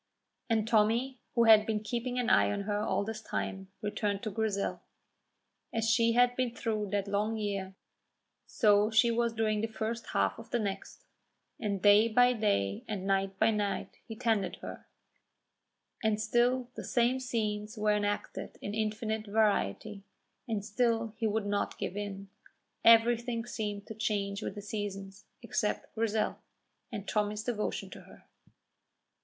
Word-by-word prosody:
And 225 -1 +1
Tommy, 230 +4 +2 0.2
who 235 - +5
had 220 -2 +7
been 215 -1 0
keeping 245 +3 -3
an 245 - 0
eye 100 -1 +5
on 100 - -2
her 205 +1 -1
all 210 - 0
this 220 +1 -5
time, 195 -2 -4 0.2
returned 205 -1 -1
to 215 - -2
Grizel. 200 -1 -1 0.9
As 225 0 -1
she 230 0 +3
had 245 +1 +4
been 245 -2 -1
through 215 -3 -2
that 200 0 -1
long 210 +2 0
year, 195 -3 -3 0.7
so 210 -1 +4
she 225 +2 +4
was 235 0 +1
during 215 -2 0
the 225 - 0
first 225 +1 -4
half 100 0 +1
of - - -11
the 240 - +1
next; 210 - -5 0.5
and 200 -5 -2
day 205 +2 +7
by 245 +2 +4
day 100 - 0
and 200 -3 -4
night 195 0 0
by 220 +2 +4
night 205 -3 -2
he 225 - -6
tended 220 -3 0
her, - - -8 1.2
and 215 -1 +2
still 240 +3 +1
the - - -7
same 245 +2 +2
scenes 215 -3 -2
were 210 0 +2
enacted 205 0 -2
in 205 - -5
infinite 220 0 -2
variety, 205 - 0 0.4
and 215 -3 -2
still 230 0 0
he 225 -1 0
would 215 0 -1
not 205 0 -1
give 185 - -4
in. 200 -1 -5 0.6
Everything 230 +1 +4
seemed 205 -4 -4
to - - -7
change 205 -2 -2
with - - -4
the 205 - -7
seasons, 200 -2 -5 0.2
except - - -2
Grizel, 220 -1 0 0.5
and 205 -3 -6
Tommy's 210 0 -1
devotion 225 -3 -3
to - - -9
her. - - -17
215 Hz, 155 wpm, -31 LUFS, 205-230 Hz, 1.2 s, had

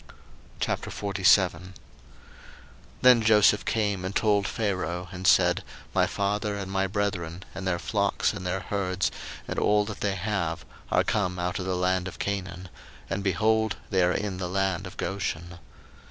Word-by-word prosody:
01:047:001 95 -2 +1 1.3
Then 125 -2 +7
Joseph 105 -1 +5
came 105 -4 0
and 95 +2 -4
told 105 -3 +2
Pharaoh, 90 -4 -2
and 95 -1 -3
said, 90 -1 +4 0.3
My - - +3
father 105 +1 -1
and 95 -1 -5
my 95 0 +1
brethren, 95 -3 -2
and 95 - -5
their 90 -2 +1
flocks, 85 - 0
and - - -6
their 90 +1 -2
herds, 95 -2 -1 0.4
and - - -2
all 105 0 +3
that 105 -1 -7
they 100 -2 0
have, 90 -4 -2 0.2
are - - +3
come 90 -3 0
out 90 +2 -2
of 95 - -4
the 95 - 0
land 90 0 +1
of 95 - -8
Canaan; 95 -2 -4 0.4
and, 95 +1 -1
behold, 110 +3 +2 0.2
they 95 -2 +3
are 90 0 +4
in 100 0 -2
the 90 -2 -3
land 95 -1 0
of 90 - -12
Goshen. 85 -3 -3
95 Hz, 155 wpm, -27 LUFS, 90-100 Hz, 1.3 s, Then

